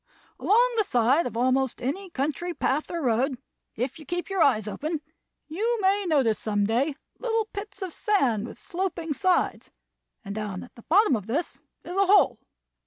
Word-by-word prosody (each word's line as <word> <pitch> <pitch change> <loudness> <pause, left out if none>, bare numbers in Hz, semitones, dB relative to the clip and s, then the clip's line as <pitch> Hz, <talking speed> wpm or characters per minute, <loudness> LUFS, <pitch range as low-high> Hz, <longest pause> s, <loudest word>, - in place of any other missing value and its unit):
Along 480 +4 +4
the 435 - +4
side 250 - +2
of 230 - -6
almost 260 +1 +1
any 365 +10 -3
country 335 +4 -2
path 290 +4 0
or 340 -3 -3
road, 255 +2 +1 0.4
if 250 +7 -3
you 310 - -11
keep 350 +4 -3
your 385 -2 +1
eyes 220 -8 +3
open, 305 +8 -3 0.5
you 445 +9 0
may 395 +1 +2
notice 265 -10 +2
some 205 -2 0
day 260 +7 +1 0.2
little 455 -2 0
pits 405 -1 -6
of 365 -4 -5
sand 250 - +1
with - - -10
sloping 345 -3 -3
sides, 370 +4 +1 0.6
and 200 - -5
down 205 -3 -4
at 245 - -14
the 235 - -14
bottom 360 - +4
of 205 -2 -5
this 290 +10 -2 0.2
is 355 - -7
a 395 0 +3
hole. 305 - +5
305 Hz, 175 wpm, -26 LUFS, 245-380 Hz, 0.6 s, hole